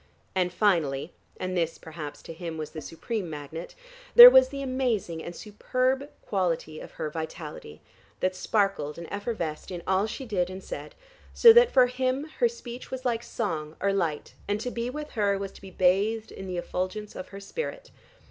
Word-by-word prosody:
And 180 Hz, -1 st, +1 dB
finally 170 Hz, -7 st, +1 dB, 0.3 s
(and 185 Hz, 0 st, -3 dB
this 165 Hz, -2 st, 0 dB
perhaps 155 Hz, -2 st, -8 dB
to 165 Hz, -, -8 dB
him 165 Hz, -1 st, -6 dB
was 155 Hz, -1 st, -5 dB
the 155 Hz, -, -7 dB
supreme 185 Hz, +5 st, -4 dB
magnet) 155 Hz, +2 st, -7 dB, 0.4 s
there 485 Hz, +1 st, +14 dB
was 260 Hz, 0 st, +7 dB
the 275 Hz, 0 st, -5 dB
amazing 240 Hz, -11 st, -1 dB
and 175 Hz, -, -7 dB
superb 255 Hz, +6 st, -1 dB
quality 170 Hz, -5 st, -1 dB
of -, -, -11 dB
her -, -, -3 dB
vitality, 155 Hz, -, -7 dB, 0.4 s
that 185 Hz, 0 st, 0 dB
sparkled 195 Hz, -9 st, 0 dB
and 170 Hz, -, -7 dB
effervesced 200 Hz, -7 st, -4 dB
in 175 Hz, -2 st, -6 dB
all 190 Hz, +2 st, +2 dB
she 265 Hz, +4 st, -6 dB
did 185 Hz, -6 st, 0 dB
and 185 Hz, +1 st, -8 dB
said, -, -, -7 dB, 0.4 s
so 460 Hz, -1 st, +9 dB
that 475 Hz, +1 st, +7 dB
for 255 Hz, -2 st, +6 dB
him 255 Hz, +2 st, -1 dB, 0.2 s
her 480 Hz, -, +4 dB
speech 250 Hz, -, -9 dB
was 260 Hz, 0 st, -6 dB
like 235 Hz, -2 st, +1 dB
song 160 Hz, -11 st, -3 dB
or 200 Hz, +1 st, +1 dB
light, 165 Hz, -6 st, -2 dB
and 205 Hz, +1 st, 0 dB
to 250 Hz, -, -3 dB
be 235 Hz, +1 st, -3 dB
with 300 Hz, +3 st, -6 dB
her 200 Hz, -2 st, +1 dB
was 195 Hz, 0 st, -5 dB
to -, -, -16 dB
be 195 Hz, -, -10 dB
bathed 200 Hz, +5 st, +1 dB
in 190 Hz, -, -8 dB
the 180 Hz, -1 st, -4 dB
effulgence 185 Hz, +4 st, -4 dB
of 185 Hz, -, -6 dB
her 195 Hz, -, -9 dB
spirit. -, -, -6 dB
195 Hz, 185 wpm, -27 LUFS, 170-245 Hz, 0.4 s, there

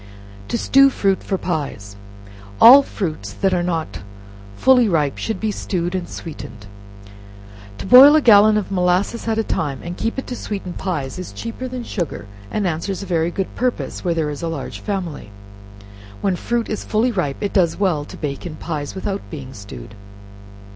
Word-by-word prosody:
To -, -, -1 dB
Stew 275 Hz, +3 st, +5 dB
Fruit 195 Hz, -7 st, 0 dB
for 190 Hz, -, -2 dB
Pies. 140 Hz, -, -4 dB, 0.6 s
All 260 Hz, +5 st, +10 dB
fruits 155 Hz, -, -5 dB
that 195 Hz, -1 st, 0 dB
are 175 Hz, -, +1 dB
not 165 Hz, -2 st, -3 dB, 0.6 s
fully 250 Hz, -4 st, +5 dB
ripe 150 Hz, -6 st, 0 dB
should 220 Hz, -4 st, -3 dB
be 220 Hz, -1 st, -1 dB
stewed 180 Hz, -3 st, -3 dB
and 185 Hz, -2 st, -3 dB
sweetened. 120 Hz, -9 st, -9 dB, 1.1 s
To -, -, -7 dB
boil 265 Hz, +8 st, +9 dB
a 310 Hz, -, +5 dB
gallon 215 Hz, -3 st, +6 dB
of 205 Hz, -1 st, -3 dB
molasses 185 Hz, +5 st, 0 dB
at 220 Hz, -1 st, 0 dB
a 225 Hz, -, +1 dB
time, 140 Hz, -9 st, -2 dB
and 175 Hz, +1 st, -5 dB
keep 225 Hz, +6 st, -3 dB
it 265 Hz, -, -3 dB
to 250 Hz, -, -5 dB
sweeten 195 Hz, -6 st, -5 dB
pies, 165 Hz, -5 st, -4 dB
is 185 Hz, -, -7 dB
cheaper 230 Hz, +3 st, -6 dB
than 250 Hz, -1 st, -6 dB
sugar, 175 Hz, -, -4 dB, 0.2 s
and 210 Hz, -, -2 dB
answers 180 Hz, +4 st, -2 dB
a -, -, -7 dB
very 170 Hz, -3 st, 0 dB
good 190 Hz, +2 st, -4 dB
purpose, 250 Hz, -1 st, -2 dB
where 175 Hz, -3 st, 0 dB
there 155 Hz, -2 st, -1 dB
is 145 Hz, -, -7 dB
a 170 Hz, -, -2 dB
large 165 Hz, -5 st, -5 dB
family. 180 Hz, -, -4 dB, 0.9 s
When 195 Hz, -2 st, +1 dB
fruit 235 Hz, +5 st, -2 dB
is 215 Hz, -, -4 dB
fully 225 Hz, +4 st, +1 dB
ripe 175 Hz, -10 st, -2 dB
it 205 Hz, -, -3 dB
does 175 Hz, -5 st, +2 dB
very -, -, -10 dB
well 155 Hz, -7 st, +1 dB
to -, -, -11 dB
bake 140 Hz, -2 st, -4 dB
in 155 Hz, -, -7 dB
pies, 155 Hz, -2 st, -5 dB
without 195 Hz, +1 st, -3 dB
being 135 Hz, -5 st, -8 dB
stewed. 100 Hz, -1 st, -10 dB
185 Hz, 185 wpm, -20 LUFS, 160-215 Hz, 1.1 s, All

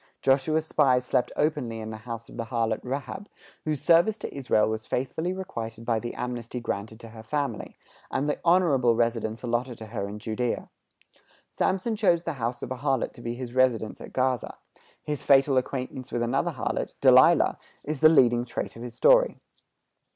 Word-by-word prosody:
Joshua's 140 Hz, +4 st, +2 dB
spies 130 Hz, -5 st, +2 dB
slept 125 Hz, -1 st, 0 dB
openly 145 Hz, -7 st, -1 dB
in 110 Hz, 0 st, -6 dB
the 110 Hz, -, -6 dB
house 115 Hz, 0 st, -7 dB
of -, -, -13 dB
the 115 Hz, -, -4 dB
harlot 115 Hz, -2 st, -1 dB
Rahab, 140 Hz, +10 st, -5 dB, 0.4 s
whose 155 Hz, -3 st, -2 dB
service 175 Hz, +6 st, +4 dB
to -, -, -7 dB
Israel 125 Hz, -6 st, +2 dB
was 110 Hz, 0 st, -4 dB
faithfully 145 Hz, +7 st, -2 dB
requited 115 Hz, -13 st, -6 dB
by 115 Hz, -2 st, +1 dB
the 120 Hz, +1 st, -6 dB
amnesty 125 Hz, 0 st, -4 dB
granted 110 Hz, -1 st, -5 dB
to 115 Hz, -, -10 dB
her 110 Hz, 0 st, -11 dB
family, 140 Hz, +5 st, -3 dB, 0.3 s
and 135 Hz, +2 st, -1 dB
the 150 Hz, -, -1 dB
honorable 160 Hz, -9 st, +4 dB
residence 115 Hz, -1 st, -1 dB
allotted 120 Hz, 0 st, -2 dB
to 110 Hz, -, -8 dB
her 100 Hz, -2 st, -4 dB
in 105 Hz, -, -7 dB
Judæa. 115 Hz, +3 st, -3 dB, 0.8 s
Samson 195 Hz, +4 st, 0 dB
chose 175 Hz, -5 st, +2 dB
the 165 Hz, -, -3 dB
house 120 Hz, +1 st, -2 dB
of -, -, -6 dB
a 130 Hz, -, -3 dB
harlot 135 Hz, -1 st, -1 dB
to 120 Hz, -, -13 dB
be 120 Hz, 0 st, -4 dB
his 125 Hz, -1 st, -7 dB
residence 125 Hz, -4 st, +1 dB
at -, -, -9 dB
Gaza; 130 Hz, -2 st, -1 dB, 0.5 s
his 150 Hz, -2 st, -3 dB
fatal 135 Hz, 0 st, +4 dB
acquaintance 130 Hz, 0 st, -3 dB
with 120 Hz, -, -1 dB
another 135 Hz, +8 st, 0 dB
harlot, 130 Hz, -, -3 dB
Delilah, -, -, +5 dB, 0.3 s
is 155 Hz, -1 st, -3 dB
the 155 Hz, -, +8 dB
leading 120 Hz, -6 st, +4 dB
trait 120 Hz, -, -5 dB
of 115 Hz, -, -10 dB
his 120 Hz, 0 st, -7 dB
story. -, -, +4 dB
125 Hz, 180 wpm, -26 LUFS, 115-150 Hz, 0.8 s, the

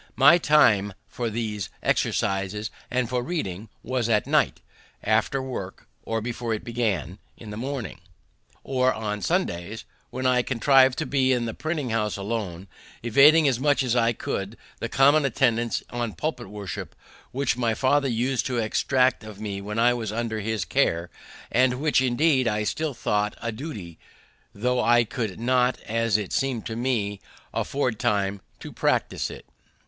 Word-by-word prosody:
My 145 Hz, +6 st, +7 dB
time 105 Hz, -, +4 dB
for 120 Hz, -2 st, -3 dB
these 105 Hz, -4 st, -3 dB
exercises 100 Hz, +2 st, 0 dB, 0.2 s
and 125 Hz, -1 st, 0 dB
for 125 Hz, +1 st, -1 dB
reading 110 Hz, -, -4 dB
was 125 Hz, -1 st, -1 dB
at 105 Hz, -2 st, +2 dB
night, -, -, +2 dB, 0.4 s
after 110 Hz, +5 st, +1 dB
work 110 Hz, -8 st, -6 dB
or 115 Hz, 0 st, -2 dB
before 115 Hz, 0 st, -2 dB
it 105 Hz, -, -7 dB
began 110 Hz, -6 st, -2 dB, 0.2 s
in 110 Hz, -2 st, -10 dB
the -, -, -6 dB
morning, 125 Hz, -, -5 dB, 0.6 s
or 130 Hz, -1 st, +2 dB
on 105 Hz, -2 st, -3 dB
Sundays, 90 Hz, +4 st, -2 dB, 0.2 s
when 130 Hz, +1 st, -5 dB
I 125 Hz, -1 st, +4 dB
contrived 130 Hz, +1 st, +4 dB
to 160 Hz, -, -1 dB
be 130 Hz, -1 st, +2 dB
in 125 Hz, -2 st, +1 dB
the 115 Hz, -, -3 dB
printing 155 Hz, -6 st, -3 dB
house 105 Hz, -2 st, 0 dB
alone, 100 Hz, -3 st, -4 dB, 0.4 s
evading 145 Hz, +7 st, +6 dB
as 125 Hz, -3 st, +1 dB
much 145 Hz, -1 st, +2 dB
as 125 Hz, -2 st, 0 dB
I 115 Hz, -1 st, +3 dB
could 105 Hz, -1 st, -4 dB, 0.2 s
the 115 Hz, -, -3 dB
common 145 Hz, +4 st, +5 dB
attendance 120 Hz, -3 st, +1 dB
on 120 Hz, -3 st, -3 dB
public 155 Hz, -7 st, -3 dB
worship 100 Hz, -1 st, -7 dB, 0.4 s
which 135 Hz, -1 st, 0 dB
my 115 Hz, -2 st, 0 dB
father 140 Hz, +3 st, +2 dB
used 125 Hz, +2 st, 0 dB
to 125 Hz, -2 st, -2 dB
exact 125 Hz, +2 st, +1 dB
of 110 Hz, -2 st, -10 dB
me 100 Hz, -2 st, -4 dB
when 105 Hz, +2 st, -5 dB
I 120 Hz, +1 st, +4 dB
was 115 Hz, -4 st, -3 dB
under 110 Hz, 0 st, -2 dB
his 110 Hz, -3 st, -2 dB
care, 85 Hz, +1 st, +1 dB, 0.4 s
and 125 Hz, +1 st, +3 dB
which 150 Hz, -2 st, +2 dB
indeed 130 Hz, +1 st, +2 dB
I 105 Hz, -1 st, 0 dB
still 155 Hz, +5 st, -2 dB
thought 105 Hz, -1 st, -1 dB
a 115 Hz, -, -3 dB
duty, 110 Hz, -, -7 dB, 0.6 s
thought 125 Hz, +3 st, +1 dB
I 120 Hz, 0 st, +5 dB
could 115 Hz, -4 st, -4 dB
not, 125 Hz, +1 st, +2 dB
as 115 Hz, -1 st, +1 dB
it 105 Hz, -3 st, -5 dB
seemed 130 Hz, -4 st, -1 dB
to 110 Hz, -, -4 dB
me, 115 Hz, -5 st, -1 dB, 0.3 s
afford 125 Hz, -6 st, -1 dB
time 100 Hz, -4 st, 0 dB, 0.2 s
to -, -, -8 dB
practise -, -, 0 dB
it. -, -, -10 dB
115 Hz, 165 wpm, -25 LUFS, 105-130 Hz, 0.6 s, My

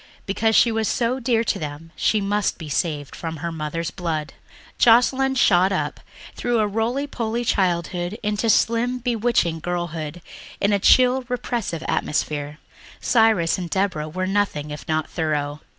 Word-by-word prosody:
Because 220 Hz, +3 st, +1 dB
she 235 Hz, -, +5 dB
was 220 Hz, -1 st, 0 dB
so 245 Hz, +2 st, 0 dB
dear 230 Hz, -2 st, +1 dB
to -, -, -1 dB
them 150 Hz, +2 st, -7 dB
she 215 Hz, -, +2 dB
must 205 Hz, 0 st, 0 dB
be 160 Hz, -3 st, -8 dB
saved 145 Hz, -1 st, -2 dB
from 165 Hz, -1 st, -5 dB
her 170 Hz, +3 st, -4 dB
mother's 160 Hz, +1 st, -4 dB
blood. 160 Hz, -5 st, -3 dB, 0.5 s
Joscelyn 260 Hz, +3 st, +4 dB
shot 190 Hz, -6 st, +4 dB
up 190 Hz, -, -2 dB, 0.4 s
through 240 Hz, -1 st, 0 dB
a 215 Hz, -, +3 dB
roly 225 Hz, +7 st, -1 dB
poly 240 Hz, -3 st, -3 dB
childhood 180 Hz, -1 st, 0 dB
into 210 Hz, +2 st, 0 dB
slim, 235 Hz, +3 st, +2 dB
bewitching 230 Hz, -8 st, 0 dB
girlhood 170 Hz, -1 st, -4 dB, 0.4 s
in 205 Hz, +1 st, +2 dB
a 200 Hz, -, +2 dB
chill 255 Hz, +5 st, +5 dB
repressive 235 Hz, -9 st, -3 dB
atmosphere. 150 Hz, 0 st, -2 dB, 0.4 s
Cyrus 220 Hz, -8 st, +3 dB
and 175 Hz, -2 st, -5 dB
Deborah 185 Hz, -6 st, -1 dB
were 185 Hz, +4 st, -3 dB
nothing 190 Hz, -7 st, -1 dB
if 150 Hz, -, -8 dB
not 155 Hz, -1 st, 0 dB
thorough. 150 Hz, -2 st, -2 dB
195 Hz, 150 wpm, -22 LUFS, 160-230 Hz, 0.5 s, she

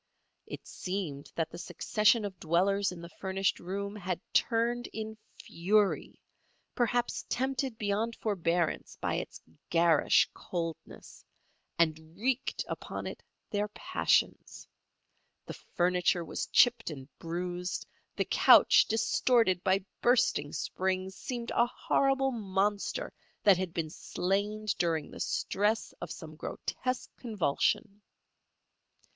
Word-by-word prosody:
It -, -, -8 dB
seemed 180 Hz, -7 st, -5 dB
that 165 Hz, -1 st, -1 dB
the 170 Hz, -, -8 dB
succession 215 Hz, +3 st, +2 dB
of 190 Hz, -3 st, -6 dB
dwellers 195 Hz, +5 st, +2 dB
in 175 Hz, -2 st, -8 dB
the 170 Hz, -, -8 dB
furnished 190 Hz, 0 st, 0 dB
room 200 Hz, +3 st, -4 dB
had 185 Hz, -4 st, -3 dB
turned 240 Hz, +1 st, +2 dB
in 220 Hz, 0 st, -6 dB, 0.3 s
fury—perhaps 215 Hz, +5 st, -1 dB
tempted 260 Hz, -1 st, -1 dB
beyond 215 Hz, +2 st, -1 dB
forbearance 175 Hz, -5 st, -1 dB
by -, -, -1 dB
its -, -, -6 dB, 0.3 s
garish 165 Hz, -2 st, +4 dB
coldness—and 165 Hz, -1 st, -5 dB
wreaked 255 Hz, +4 st, -1 dB
upon -, -, -5 dB
it -, -, -6 dB, 0.3 s
their 205 Hz, 0 st, 0 dB
passions. 210 Hz, -, 0 dB, 0.8 s
The -, -, -6 dB
furniture 180 Hz, -1 st, 0 dB
was -, -, -3 dB
chipped 240 Hz, -4 st, +4 dB
and 135 Hz, -4 st, -8 dB
bruised; 175 Hz, +2 st, -3 dB, 0.3 s
the -, -, 0 dB
couch, -, -, +7 dB
distorted 225 Hz, -3 st, +2 dB
by 190 Hz, 0 st, +2 dB, 0.2 s
bursting 240 Hz, -, +3 dB
springs, 190 Hz, 0 st, -2 dB
seemed 240 Hz, +1 st, -5 dB
a 235 Hz, -, +3 dB
horrible 270 Hz, +2 st, +1 dB
monster 205 Hz, -, -1 dB, 0.3 s
that 200 Hz, -3 st, +6 dB
had 185 Hz, -2 st, -2 dB
been 165 Hz, -2 st, -3 dB
slain 205 Hz, +6 st, -2 dB
during 165 Hz, -3 st, 0 dB
the -, -, -10 dB
stress 210 Hz, +2 st, 0 dB
of -, -, -5 dB
some 155 Hz, -2 st, -8 dB
grotesque 255 Hz, +8 st, -4 dB
convulsion. 210 Hz, -, 0 dB
195 Hz, 110 wpm, -30 LUFS, 175-225 Hz, 0.8 s, couch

